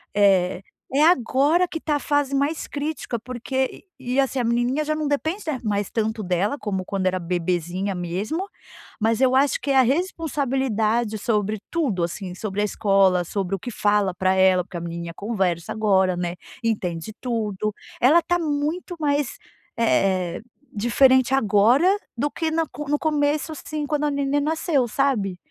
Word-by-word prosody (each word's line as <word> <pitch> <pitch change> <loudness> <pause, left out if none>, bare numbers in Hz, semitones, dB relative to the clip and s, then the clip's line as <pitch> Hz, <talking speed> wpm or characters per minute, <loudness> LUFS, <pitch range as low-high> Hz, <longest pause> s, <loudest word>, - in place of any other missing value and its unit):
eh, 190 -3 +3 0.3
é 290 - +4
agora 310 +3 +3
que 325 - -5
tá 300 -2 0
a - - 0
fase 290 -2 0
mais 285 +3 -1
crítica, 290 -5 -4
porque 255 +2 -3 0.2
e 250 -1 -4
e - - +3
assim 270 -1 +1
a - - +1
menininha 240 +5 +1
já 310 - 0
não 305 -1 -2
depende, 315 +7 -1
né, 270 -5 -1
mais 205 -2 -1
tanto 220 -1 -1
dela, 185 +7 0
como 190 -3 -3
quando 190 -2 -1
era 185 0 0
bebezinha 180 +2 -2
mesmo. 200 - -3 0.5
Mas 225 +3 +1
eu 260 0 +4
acho 280 +1 +3
que 280 - -1
é - - +2
a - - +8
responsabilidade 260 - 0
sobre 210 -1 -1
tudo, 255 - 0
assim, 180 +1 -4
sobre 205 0 -3
a - - +2
escola, 195 -3 +3
sobre 195 +1 -2
o - - -7
que 245 - -6
fala 205 -3 +1
pra 185 +1 +1
ela, 185 -1 +4
porque 180 -1 -8
a - - -5
menina 170 0 -5
conversa 190 -6 -1
agora, 190 -4 +2
né, 175 0 -2 0.3
entende 190 -4 -2
tudo. 215 -4 -2 0.3
Ela 305 +8 +6
tá 350 +2 0
muito 310 +3 -2
mais, 285 -3 0 0.4
eh, 190 -6 +1 0.3
diferente 260 +4 +4
agora 230 - +4 0.3
do 290 +4 0
que 325 -1 -2
na 325 0 +1
co 295 -1 -8
no 295 - +2
começo, 300 0 0
assim, 305 0 -5
quando 300 0 0
a 295 - +1
neném 280 0 0
nasceu, 305 -4 +1
sabe. 215 -8 0
235 Hz, 170 wpm, -23 LUFS, 195-290 Hz, 0.5 s, a